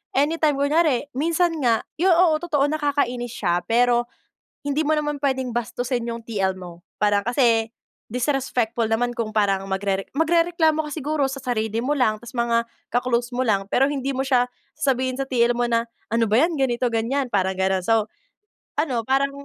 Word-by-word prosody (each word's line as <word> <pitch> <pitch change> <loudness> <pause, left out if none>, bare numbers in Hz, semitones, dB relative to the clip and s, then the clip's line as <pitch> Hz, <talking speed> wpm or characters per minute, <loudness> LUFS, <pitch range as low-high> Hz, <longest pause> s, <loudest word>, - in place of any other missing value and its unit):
anytime 300 +1 +2
kunyari 290 -1 +1
minsan 330 +4 0
nga 235 -5 +2 0.2
yon, 360 -1 +4
oo 335 -3 +4
totoo 310 -4 0
nakakainis 280 -6 -1
siya 175 -3 +1
pero 240 +1 +3 0.6
hindi 285 +2 +1
mo 305 - 0
naman 295 -2 -1
puwedeng 260 -3 -1
bastusin 240 +1 -2
yung 230 0 -4
TL 190 -4 -1
mo 175 -1 -11 0.2
para 205 -1 +2
kasi 230 -2 +2 0.4
disrespectful 245 -3 0
naman 240 +2 0
kung 225 -2 -3
parang 200 -3 +1
magrere 195 0 -2
magrereklamo 325 0 +2
ka 300 - -7
siguro 300 -1 -1
sa 275 - -5
sarili 225 -4 -2
mo 270 +5 0
lang 220 -6 +1
tapos 235 +2 -12
mga 235 -1 +1 0.2
ka-close 245 0 0
mo 250 +1 -1
lang 200 -3 +2
pero 270 +2 +4
hindi 275 -1 -2
mo 265 - -2
siya 250 -2 +3 0.3
sasabihin 260 -1 0
sa 270 - -2
TL 240 -2 +2
mo 240 - 0
na, 235 -1 0 0.2
"ano 230 0 +2
ba 220 +7 +4
yan" 330 -3 0
ganito 245 -2 +1
ganyan 245 +3 -1
parang 190 -1 +1
ganon. 190 0 +1
So, 220 +2 +1 0.7
ano 275 -6 0
parang 275 +1 +2
245 Hz, 175 wpm, -23 LUFS, 230-285 Hz, 0.7 s, yon